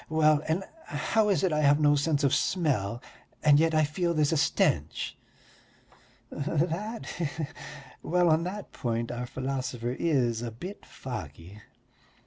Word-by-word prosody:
Well, 155 -1 +4
and 165 +5 0 0.2
how 220 -2 +1
is 195 - +2
it 185 -4 +2
I 150 - +1
have 145 0 +5
no 145 -1 +5
sense 145 0 +1
of 140 - +3
smell 125 - 0 0.4
and 150 -1 +6
yet 160 0 +2
I 155 - +4
feel 170 +3 -1
there's 150 -2 +2
a - - +2
stench?" 145 - +1 1.2
"That... 170 +9 -2
he 175 - -3
he.... 155 +2 -3 0.6
Well, 175 +1 +2
on 160 +1 +3
that 200 +3 -6
point 115 -1 -2
our 120 0 -4
philosopher 130 -2 -3
is 125 -8 +1
a 120 - -3
bit 180 - -9
foggy. 95 - -8
150 Hz, 150 wpm, -28 LUFS, 125-165 Hz, 1.2 s, and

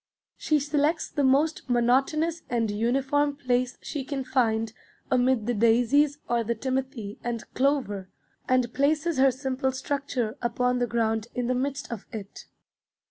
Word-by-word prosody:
She 305 -1 +1
selects 295 +3 0
the 290 - 0
most 275 +2 +2
monotonous 270 +7 +2
and 230 -3 0
uniform 270 +6 +1
place 255 -2 0
she 290 -3 -4
can 270 0 -3
find 225 -4 +1 0.4
amid 250 -3 +3
the 245 - 0
daisies 245 +6 +3
or 235 -1 +1
the 235 +1 -1
timothy 260 -3 -3
and 235 -1 -3
clover, 255 -9 0 0.4
and 250 -2 +2
places 300 +2 +1
her 270 0 +6
simple 265 0 -1
structure 260 -3 -2
upon 250 +1 0
the 245 - +1
ground 225 -1 0
in 250 - -1
the 250 - +1
midst 270 +1 -2
of 230 -4 -6
it. 210 -4 -8
255 Hz, 145 wpm, -26 LUFS, 235-280 Hz, 0.4 s, her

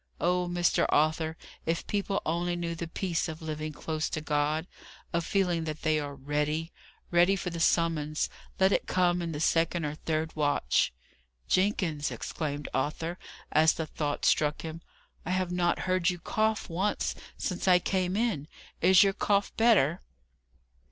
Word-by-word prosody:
Oh, 180 0 +1
Mr. 175 0 +2
Arthur, 155 +1 +2 0.3
if 165 0 0
people 200 -1 -1
only 175 +2 0
knew 170 -1 -3
the 165 0 -5
peace 170 0 -2
of 160 0 -6
living 155 -1 -4
close 155 +1 -3
to - - -2
God 150 +1 0 0.5
of 170 0 +1
feeling 175 -3 +1
that 155 -1 -5
they 155 -1 +2
are 145 -1 -5
READY! 150 +4 -1 0.4
Ready 175 +3 +5
for 180 -2 -4
the 170 - -5
summons, 165 -2 +1 0.3
let 190 +1 +5
it - - +1
come 180 -1 +2
in 170 -1 -3
the 145 - -4
second 165 +1 +2
or 145 - -2
third 155 +1 -2
watch!" 145 - +2 0.6
"Jenkins!" 185 -6 +1
exclaimed 145 -2 -4
Arthur, 165 +5 -2 0.3
as 155 +1 +5
the 160 - -3
thought 150 -1 -3
struck 150 -1 +2
him: 165 0 -6 0.4
"I - - -6
have 185 -1 0
not 175 -1 +1
heard 185 -1 +2
you 180 - -2
cough 215 +5 0
once 190 +5 -1 0.2
since 180 0 -3
I 180 -1 +7
came 185 +1 0
in! 215 -11 0 0.3
Is 185 +3 +7
your 195 -1 +2
cough 200 0 +1
better!" 195 - +4
165 Hz, 160 wpm, -29 LUFS, 155-180 Hz, 0.6 s, I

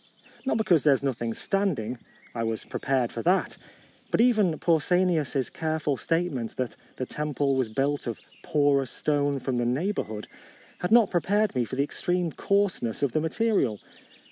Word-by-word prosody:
Not 245 - +2
be 220 - +1
cause 170 -7 +4
there 145 -2 +5
is 135 - -5
nothing 120 -4 -1
standing; 155 - -1 0.3
I 115 - -3
was 115 -1 -2
prepared 130 -4 -1
for 115 - -4
that. 185 +7 +1 0.5
But - - +1
even 215 -9 +4
Pausanias's 165 -4 +1
careful 155 -2 -1
statement, 150 -5 -2
that 125 -2 -2 0.2
the 130 - -3
temple 145 -1 -1
was 130 -4 0
built 140 +5 -1
of 115 - -4 0.2
"porous 140 -3 +2
stone 145 -1 0
from 130 -1 -2
the 120 - 0
neighbourhood," 125 - -2 0.5
had 180 - -2
not 230 -2 +6
prepared 205 +4 +1
me 125 -3 0
for 130 - -6
the 140 - +2
ex 145 - -5
treme 175 -2 0
coarseness 195 - 0
of 140 - +2
the 155 - +1
material. 160 - +1
145 Hz, 170 wpm, -27 LUFS, 125-180 Hz, 0.5 s, not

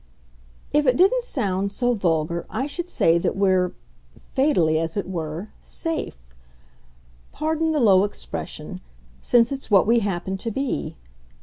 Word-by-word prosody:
"If 295 -1 +3
it 250 - +4
didn't 470 +8 +4
sound 200 - -1
so 245 +3 +1
vulgar 170 -4 -1
I 260 - -2
should 345 +5 -5
say 170 - +3
that - - -1
we're 185 -2 +2 0.5
fatally, 180 - +1
as 165 +3 -3
it 200 - -2
were 170 +2 -5
SAFE. 330 - -4 1.1
Pardon 320 +1 0
the 305 - +1
low 195 -6 +5
expression - - -6 0.4
since 240 +1 +3
it's 275 -1 -5
what 200 -3 +5
we 235 +2 +4
happen 190 -2 -2
to 230 - -3
be. 270 +4 -3
205 Hz, 140 wpm, -23 LUFS, 180-280 Hz, 1.1 s, low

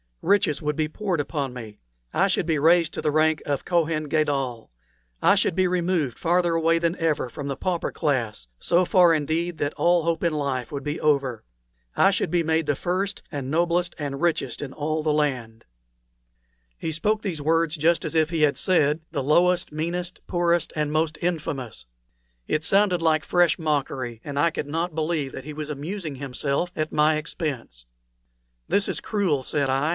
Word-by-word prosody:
Riches 190 -6 +2
would 150 0 -1
be 155 0 0
poured 180 +1 -2
upon 145 -2 -2
me; 110 -4 -9 0.3
I 195 - +3
should 185 - 0
be 160 -3 +1
raised 165 +1 +4
to - - -4
the 150 - +1
rank 155 +1 +2
of 140 -2 -2
Kohen 165 -3 +1
Gadol; 140 - -1 0.5
I 195 - +5
should 195 -4 +1
be 185 0 +3
removed 175 -7 0
farther 175 0 +2
away 165 0 +3
than 170 +1 0
ever 160 -5 0
from 140 +4 -7
the 135 - -2
pauper 180 +1 -2
class 120 - -2
so 180 +2 +2
far, 175 -2 +5
indeed, 160 +3 -1
that 145 +1 -1
all 175 -1 +3
hope 165 0 -1
in 170 -2 +2
life 135 -5 -2
would 140 -2 -4
be 145 +2 -3
over. 140 -5 +1 0.5
I 195 - +5
should 190 - -1
be 175 0 +1
made 160 -1 +1
the 145 - +2
first 185 +6 -2
and 140 -4 -4
noblest 175 +3 +1
and 140 -1 -4
richest 165 -7 0
in 135 -2 -6
all 155 +1 -2
the 155 -1 +1
land." 130 -7 -2 1.1
He 160 - -3
spoke 210 +7 0
these 175 -7 -3
words 165 +1 +1
just 165 +2 +2
as - - -3
if 160 -1 +2
he 165 -2 0
had 145 -2 +3
said, 155 -4 +2
"the 145 -4 -2
lowest, 175 +5 +3
meanest, 175 +4 -4
poorest, 175 -1 +1
and 150 -1 -1
most 155 +1 0
infamous." 150 - -3 0.6
It 155 - 0
sounded 195 0 +3
like 155 -1 +2
fresh 175 -2 +3
mockery, 135 -7 -2
and 145 -1 -6
I 165 +4 +3
could 150 - -4
not 165 +2 -2
believe 155 -3 -1
but - - -9
that 135 - -8
he 150 - -6
was 150 0 -6
amusing 155 +2 -5
himself 140 +5 -2
at 155 0 -2
my 155 +1 +3
expense. 140 - -5 0.8
"This 200 - +2
is - - -2
cruel," 190 -10 0
said 140 +1 -1
I. 135 +4 +1
155 Hz, 190 wpm, -24 LUFS, 145-170 Hz, 1.1 s, I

